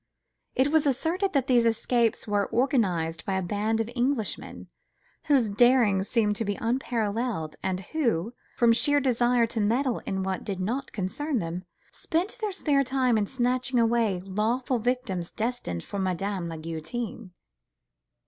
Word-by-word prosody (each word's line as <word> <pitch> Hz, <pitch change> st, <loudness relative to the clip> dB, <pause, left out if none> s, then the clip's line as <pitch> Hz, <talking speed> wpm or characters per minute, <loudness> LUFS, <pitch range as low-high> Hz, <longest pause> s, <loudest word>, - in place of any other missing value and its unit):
It 265 Hz, +2 st, +3 dB
was 315 Hz, -2 st, +3 dB
asserted 335 Hz, +9 st, 0 dB
that 275 Hz, -4 st, +2 dB
these 245 Hz, -3 st, +4 dB
escapes 230 Hz, 0 st, +1 dB
were 205 Hz, -1 st, 0 dB
organised 190 Hz, -, +1 dB
by 195 Hz, -, -2 dB
a 190 Hz, -, 0 dB
band 210 Hz, +5 st, -1 dB
of 225 Hz, -, 0 dB
Englishmen, 245 Hz, -3 st, -2 dB, 0.6 s
whose 270 Hz, -6 st, +4 dB
daring 215 Hz, -2 st, +4 dB
seemed 210 Hz, 0 st, +1 dB
to 225 Hz, -, -1 dB
be 205 Hz, -1 st, -2 dB
unparalleled, 230 Hz, -7 st, -1 dB
and 190 Hz, 0 st, -2 dB
who, 230 Hz, -, -1 dB, 0.2 s
from 235 Hz, -1 st, +5 dB
sheer 290 Hz, +5 st, +3 dB
desire 245 Hz, -2 st, +2 dB
to 230 Hz, 0 st, -4 dB
meddle 235 Hz, +4 st, +1 dB
in 190 Hz, -1 st, -1 dB
what 190 Hz, -1 st, -2 dB
did 195 Hz, -3 st, -4 dB
not 245 Hz, +9 st, -2 dB
concern 255 Hz, +9 st, -2 dB
them, 175 Hz, -1 st, -4 dB, 0.3 s
spent 365 Hz, +9 st, -2 dB
their 425 Hz, -1 st, -1 dB
spare 290 Hz, -7 st, +2 dB
time 255 Hz, -2 st, +1 dB
in 210 Hz, -2 st, +1 dB
snatching 250 Hz, +1 st, 0 dB
away 230 Hz, -4 st, +2 dB
lawful 225 Hz, +7 st, -1 dB
victims 220 Hz, -8 st, -1 dB
destined 225 Hz, -, -3 dB
for 200 Hz, -, -5 dB
Madame 190 Hz, -1 st, -2 dB
la 165 Hz, -, -6 dB
Guillotine. 175 Hz, +7 st, -5 dB
230 Hz, 150 wpm, -27 LUFS, 195-255 Hz, 0.6 s, from